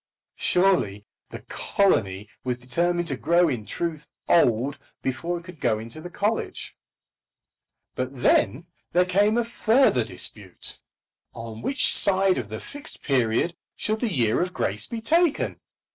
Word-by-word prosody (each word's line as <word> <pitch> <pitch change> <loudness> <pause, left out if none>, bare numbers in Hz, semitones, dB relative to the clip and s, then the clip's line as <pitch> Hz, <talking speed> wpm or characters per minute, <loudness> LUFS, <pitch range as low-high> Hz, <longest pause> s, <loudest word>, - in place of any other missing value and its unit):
Surely 175 - +2 0.2
the - - -8
colony 105 - 0 0.2
was 125 -1 -1
determined 170 +8 -1
to 140 - -2
grow 170 +6 +3
in 120 -8 -3
truth 165 -3 -4 0.2
old 130 -3 +3 0.2
before 165 +7 -2
it 170 - -10
could 170 -3 -12
go 115 -5 +1
into 115 +8 -9
the 175 - -7
college. 205 +5 -2 1.2
But 130 0 -2
then 150 +7 +3 0.3
there 180 +1 +4
came 205 +4 +2
a 240 - +1
further 230 - +3
dispute. 105 -3 -5 0.6
On 115 -1 -8
which 275 - +3
side 195 -3 +5
of 110 -5 -6
the 110 0 -5
Fixed 290 +2 -5
Period 130 +5 +1 0.2
should 215 0 -1
the 235 -3 -1
year 115 -9 +2
of 180 0 -2
grace 105 +3 -2
be 230 -1 -5
taken? 330 +5 +1
170 Hz, 145 wpm, -25 LUFS, 115-195 Hz, 1.2 s, side